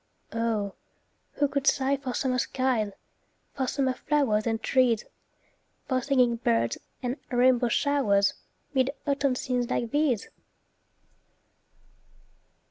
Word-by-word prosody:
Oh, 225 -3 -1 0.6
who 290 - +1
could 280 0 -2
sigh 270 0 +3
for 265 -3 -5
summer 255 -1 0
skies, 245 -5 0 0.6
For 265 -2 -2
summer 265 -1 0
flowers 255 -7 +1
and 225 -1 0
trees, 245 -3 +2 0.8
For 260 -1 +1
singing 250 -3 +2
birds 115 - +1 0.2
and 250 +2 -2
rainbow 245 -1 +3
showers, 230 -7 +2 0.4
'Mid 260 -1 +2 0.2
autumn 280 -2 +1
scenes 250 -1 -1
like 235 -2 -1
these? 290 -8 +1
255 Hz, 110 wpm, -27 LUFS, 230-275 Hz, 0.8 s, sigh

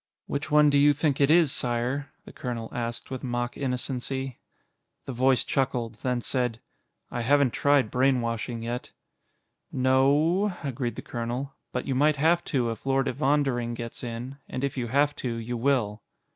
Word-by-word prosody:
"Which 145 +2 -3
one 150 0 +5
do 140 - +4
you 145 +1 +6
think 145 -1 0
it 140 - +5
is, 160 -3 +5
Sire?" 125 +4 -1
the - - -12
colonel 120 -3 -4
asked 120 +1 -4
with 130 - -5
mock 120 -1 -2
innocency. 130 0 -3 0.7
The 135 - -5
voice 130 +1 +3
chuckled, 125 -4 -1
then 125 -1 0
said, 125 -2 -1 0.5
"I 120 - -2
haven't 140 +1 +3
tried 140 -5 +3
brainwashing 120 -3 0
yet." 120 +1 -4 0.8
"No 130 +1 +3
o 160 +7 +3
o," 175 -7 -4
agreed 125 -2 -3
the - - -7
colonel, 120 +4 -4 0.2
"but 125 - -3
you 135 - -1
might 150 +3 +3
have 165 +4 +3
to 125 -5 0
if 115 - -8
Lord 135 0 +2
Evondering 135 -3 +1
gets 115 +1 -7
in, 120 +3 -6
and 130 - -4
if 140 - -1
you 125 -3 -2
have 145 +4 +2
to, 120 -3 -3
you 115 +1 -4
will." 115 -4 +1
130 Hz, 170 wpm, -27 LUFS, 120-140 Hz, 0.8 s, you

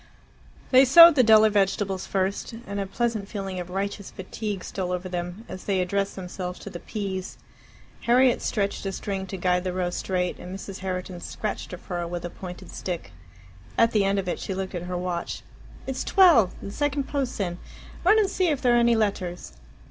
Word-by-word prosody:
They 260 0 +8
sowed 335 +6 +10
the 275 - +5
duller 220 -2 +6
vegetables 195 -1 0
first, 195 +4 -1
and 200 0 -4
a 195 - -2
pleasant 220 -1 -2
feeling 195 -3 -4
of 180 0 -6
righteous 200 +1 -3
fatigue 195 0 -5
stole 185 -2 -4
over 180 +1 -3
them 180 +4 -5
as 185 - -8
they 195 -2 +1
addressed 195 +2 -1
themselves 180 -1 -5
to - - -8
the 175 - -7
peas. 195 -3 -5 0.7
Harriet 250 +1 +4
stretched 200 -2 -1
a - - -1
string 195 0 -4
to 195 - -5
guide 180 0 +1
the 185 -1 -2
row 180 -1 -1
straight, 180 0 -2
and 180 +1 -7
Mrs. 195 0 -8
Herriton 185 -1 -4
scratched 215 - -4
a 180 - -5
furrow 175 -1 -4
with 175 0 -5
a 175 - -5
pointed 180 -1 -9
stick. 175 -3 -5 0.7
At 230 0 +5
the 210 -2 +3
end 195 +1 +1
of 190 -2 -2
it 175 - -2
she 190 - -4
looked 190 0 -4
at 175 - -3
her 180 - -2
watch. 175 -1 -3 0.4
"It's 265 -1 -3
twelve! 330 - +5
The 200 - -6
second 290 +3 0
post's 270 -4 -3
in. 175 -3 -2 0.4
Run 410 +5 +6
and 425 -2 +4
see 375 -1 0
if 295 -5 +1
there 245 -3 +3
are - - +5
any 235 0 +4
letters." 195 -5 -2
195 Hz, 200 wpm, -25 LUFS, 180-225 Hz, 0.7 s, sowed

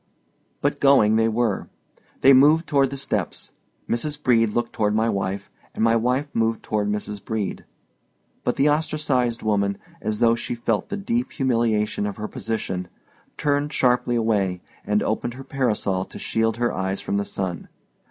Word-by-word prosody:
But - - 0
going 135 -6 +5
they 110 0 +3
were. 115 -3 0 0.5
They 135 - +8
moved 150 +5 +6
toward 140 -3 +2
the 140 - -6
steps. 135 - -3 0.4
Mrs. 145 +5 -2
Brede 115 -5 +3
looked 120 0 -1
toward 105 -1 +1
my 110 +1 +2
wife, 100 -1 -3 0.2
and - - 0
my 115 0 +4
wife 125 +5 +1
moved 115 0 0
toward 105 -1 -1
Mrs. 105 -1 -3
Brede. 110 -3 -3 0.8
But - - 0
the 140 - +3
ostracized 145 -6 0
woman, 100 -2 +1 0.2
as 105 -1 -2
though 115 0 +4
she 120 +1 -3
felt 115 - -1
the 205 - -3
deep 235 +5 -2
humiliation 115 -6 +1
of 100 - -5
her 110 0 -4
position, 95 -6 -3 0.5
turned 145 +1 0
sharply 125 -2 +2
away, 100 -6 0 0.2
and 105 0 +1
opened 120 +2 -2
her 135 - -8
parasol 105 -9 0
to - - -11
shield 115 0 0
her 120 0 0
eyes 95 +1 -2
from 100 - -2
the 100 - 0
sun. 95 -4 -4
115 Hz, 165 wpm, -23 LUFS, 105-130 Hz, 0.8 s, They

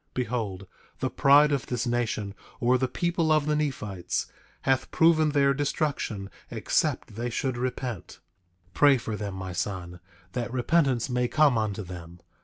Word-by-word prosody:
Behold, 110 -6 -2 0.3
the - - -1
pride 145 +2 +5
of 140 -3 -1
this 125 -2 -2
nation, 115 -4 -1 0.3
or 125 +2 +3
the 130 - +1
people 170 +1 0
of 155 -2 +3
the 150 0 +1
Nephites, 105 -12 -2 0.4
hath 130 -1 +1
proven 160 -1 +4
their 140 -1 +3
destruction 140 -8 -2 0.2
except - - -1
they 120 +3 -3
should 130 +2 -2
repent. 125 - -4 0.5
8:28 - - -35
Pray 140 +6 +5
for 110 -2 -4
them, 100 -2 -5
my 95 -1 -5
son, 90 -1 -4 0.3
that 120 -1 -3
repentance 130 -1 +2
may 125 -1 0
come 150 -1 +4
unto 110 -2 -1
them. 90 -1 -10
125 Hz, 155 wpm, -27 LUFS, 105-140 Hz, 0.5 s, pride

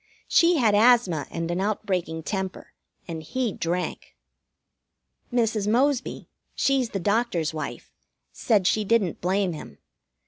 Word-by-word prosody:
She 340 0 +4
had 225 -6 +3
asthma 210 -8 +4
and 165 0 -3
an 175 +2 -1
outbreaking 185 -6 -2
temper, 190 0 -4 0.3
and 165 -2 -5
he 235 +6 -2
drank. 175 +2 -3 1.2
Mrs. 225 -4 +1
Mosby 255 +4 +1 0.3
she's 270 -3 +1
the 195 - -3
doctor's 195 -5 0
wife 155 - -6 0.4
said 210 -6 +1
she 215 +3 +2
didn't 205 -5 +1
blame 185 0 +1
him. 150 - -10
205 Hz, 125 wpm, -25 LUFS, 175-230 Hz, 1.2 s, She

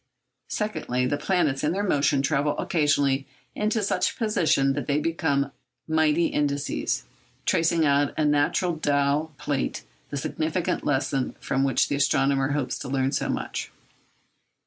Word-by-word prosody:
Secondly, 125 - -1
the 125 - 0
planets 150 -3 0
in 150 +2 +1
their 200 +2 -1
motion 140 -6 +2
travel 145 0 +1
occasionally 140 -4 +1 0.3
into 215 +1 0
such 185 -2 0
positions 165 - +2
that 145 - -4
they 145 0 +2
become 145 -4 0 0.4
mighty 160 +1 +3
indices, 140 - -1 0.4
tracing 165 -1 +2
out 140 0 +3
on - - -11
a 155 - +2
natural 150 +4 +2
dial 145 +1 +1
plate 140 -2 -2 0.3
the 145 - -4
significant 160 +5 -2
lesson 135 -1 0
from 135 0 0
which 135 -3 +2
the - - -1
astronomer 135 0 +2
hopes 145 -3 -2
to 135 - -6
learn 135 0 +1
so - - -1
much. - - -3
145 Hz, 145 wpm, -25 LUFS, 140-160 Hz, 0.4 s, mighty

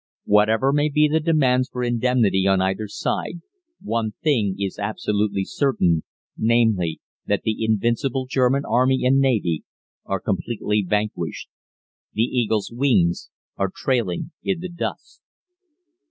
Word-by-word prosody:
"Whatever 110 +6 +3
may 145 +1 +2
be 150 +1 +3
the 155 +2 +2
demands 135 -6 +2
for 125 - -4
indemnity 120 -5 +2
on 95 -1 +3
either 95 +3 -1
side, 170 +10 -3 0.4
one 110 -1 -1
thing 115 - +2
is 100 0 -4
absolutely 105 -1 -1
certain, 90 - +1 0.3
namely, 110 -8 +1 0.3
that - - 0
the 110 0 -1
invincible 120 +4 0
German 130 +1 +2
Army 130 +1 +2
and 135 +2 +4
Navy 110 - +1 0.4
are 95 -1 -2
completely 105 +1 -1
vanquished. 105 -6 -2 0.6
The 110 - +1
Eagle's 115 -4 0
wings 115 -10 +1 0.3
are 100 -1 0
trailing 120 - -1
in 190 -3 -1
the 185 - -5
dust." 170 0 -6
115 Hz, 125 wpm, -22 LUFS, 100-130 Hz, 0.6 s, and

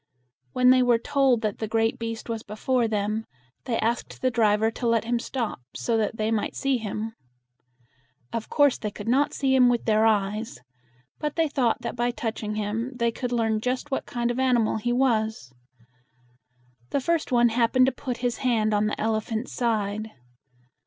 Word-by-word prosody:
When 250 0 +5
they 255 0 +5
were 245 -2 +4
told 260 -1 +2
that 215 -2 -2
the 220 - -2
great 225 +3 0
beast 225 -1 -5
was 225 -2 -3
before 230 +4 0
them, 215 +1 -2 0.4
they 240 -3 -1
asked 230 +2 -2
the 255 - +3
driver 220 -1 +2
to 240 +1 -3
let 230 -1 +2
him 235 +1 0
stop 235 - -3 0.2
so 230 - -1
that 220 0 0
they 215 +1 0
might 220 -2 -1
see 275 -2 0
him. 220 +1 -4 1.2
Of 230 -1 -4
course 285 -3 +3
they 210 - -3
could 205 +1 -9
not 270 +5 +3
see 270 -2 +1
him 255 -2 +6
with 240 -1 0
their 220 0 +4
eyes; 210 - 0 0.6
but 300 -1 -3
they 325 -1 +2
thought 245 -5 0
that 235 - -4
by 240 0 0
touching 220 -3 -4
him 215 +5 -2
they 235 -1 +1
could 245 +2 -4
learn 225 -2 +1
just 255 +4 -2
what 270 - -2
kind 240 0 -1
of 240 - -3
animal 245 -5 +2
he 240 +3 -1
was. 220 - 0 1.4
The - - 0
first 330 +1 -1
one 240 -1 +5
happened 240 +2 +3
to 265 - +2
put 250 -3 -5
his 240 -2 0
hand 225 -4 +1
on 210 +1 +2
the 210 - -3
elephant's 220 +2 -2
side. 215 -2 -1
230 Hz, 185 wpm, -25 LUFS, 220-250 Hz, 1.4 s, him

